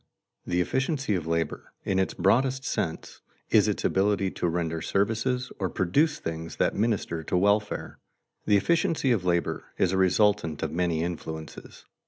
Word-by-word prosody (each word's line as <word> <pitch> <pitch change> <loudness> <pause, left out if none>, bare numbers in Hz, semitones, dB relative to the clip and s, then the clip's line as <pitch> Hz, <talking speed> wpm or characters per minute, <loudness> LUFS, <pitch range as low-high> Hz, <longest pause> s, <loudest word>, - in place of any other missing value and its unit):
_The 90 - 0
efficiency 135 - 0
of 85 -4 -2
labor, 85 0 -2
in 95 -1 +1
its 95 - 0
broadest 130 +6 +2
sense, 80 -4 -3 0.3
is - - +5
its - - -1
ability 100 0 +2
to - - -2
render 80 -1 -1
services 115 +7 0
or 95 -2 -1
produce 145 - +1
things 80 0 -5
that - - +1
minister 105 -6 -1
to 90 - -1
welfare._ 100 +2 +1 0.5
The 105 - +5
efficiency 160 - +1
of 105 -6 +1
labor 85 -1 0
is 90 - +2
a 95 - 0
resultant 95 -4 +2
of 80 - -2
many 85 -1 0
influences. 80 -2 -7
95 Hz, 155 wpm, -27 LUFS, 85-110 Hz, 0.5 s, is